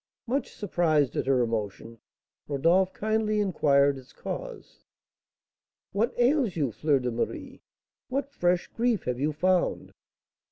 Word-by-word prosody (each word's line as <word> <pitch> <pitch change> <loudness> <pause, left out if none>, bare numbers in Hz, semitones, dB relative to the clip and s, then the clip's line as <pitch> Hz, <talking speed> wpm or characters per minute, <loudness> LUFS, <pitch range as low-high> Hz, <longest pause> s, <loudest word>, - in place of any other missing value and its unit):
Much 255 +2 -2
surprised 160 -8 +1
at - - -1
her 130 -2 +3
emotion, 115 0 -4 0.5
Rodolph 170 +7 +2
kindly 215 0 0
inquired 140 -8 +3
its 130 - -17
cause. - - -7 1.1
"What 220 +5 +1
ails 245 - +2
you, 145 -7 0
Fleur 150 +4 +1
de 125 -2 -2
Marie? 115 - -4 0.5
What 275 +2 -2
fresh 175 -8 +1
grief 235 -2 0
have 125 -1 -2
you 150 +3 +1
found?" 180 +4 0
170 Hz, 125 wpm, -27 LUFS, 135-215 Hz, 1.1 s, her